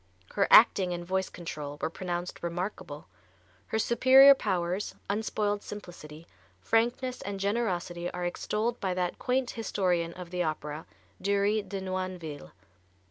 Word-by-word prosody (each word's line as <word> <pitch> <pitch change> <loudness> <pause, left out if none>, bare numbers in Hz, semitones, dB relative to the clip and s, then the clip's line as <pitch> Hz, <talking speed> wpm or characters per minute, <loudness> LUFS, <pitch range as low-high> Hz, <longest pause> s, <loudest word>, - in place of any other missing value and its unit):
Her 200 - +2
acting 190 -5 +6
and 175 0 -5
voice 190 +1 -1
control 150 -4 -7
were - - -2
pronounced 175 0 -4
remarkable. 170 -3 -5 0.6
Her - - -1
superior 260 +5 +7
powers, 185 -5 -2 0.2
unspoiled 205 -1 -1
simplicity, 170 -6 -10 0.3
frankness 240 - 0
and 200 +1 -5
generosity 185 -5 -1
are 180 0 -4
extolled 215 +6 -2
by 185 -2 -1
that 180 -1 -2
quaint 255 0 0
historian 180 -6 -1
of 180 -1 -9
the 180 -1 -1
opera, 155 -1 -3 0.3
Dury 200 +2 +2
de 200 -1 -6
Noinville. 185 -5 -5
185 Hz, 130 wpm, -29 LUFS, 175-210 Hz, 0.6 s, superior